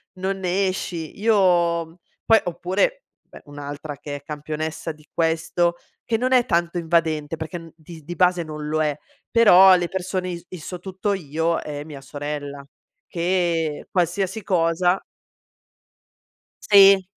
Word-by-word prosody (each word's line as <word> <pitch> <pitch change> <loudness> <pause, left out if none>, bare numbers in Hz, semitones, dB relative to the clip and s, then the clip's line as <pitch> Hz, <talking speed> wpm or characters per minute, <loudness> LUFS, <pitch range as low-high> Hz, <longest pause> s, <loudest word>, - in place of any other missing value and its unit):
non 190 +1 -2
ne 190 +1 +1
esci. 170 -3 -4
Io 175 -6 +2 0.3
poi 225 -1 +6
oppure 190 - -1 0.3
beh - - -14
un'altra 145 0 -7
che 145 -1 -7
è 140 - -15
campionessa 155 +2 -4
di 150 0 -17
questo, 165 +1 +1 0.3
che 225 - 0
non 255 +2 -1
è 245 -2 +5
tanto 170 0 0
invadente 160 -2 0
perché 160 +2 -5
n 165 -1 -13
dis 160 0 -12
di 175 +3 -7
base 180 0 +3
non 150 -1 -7
lo 155 +1 0
è. 150 -1 -1 0.3
Però 190 -5 +8
le 175 -1 0
persone 185 0 -3
i 170 -1 -7
i 185 - -7
sò 180 +3 -7
tutto 190 +2 -2
io 165 -1 -1
è 145 -1 -6
mia 145 -3 -9
sorella 145 -1 -6 0.4
che 170 -3 -1
qualsiasi 190 +3 -1
cosa 175 +1 +2 1.6
Sì. 195 -1 +7
170 Hz, 145 wpm, -23 LUFS, 155-185 Hz, 1.6 s, Però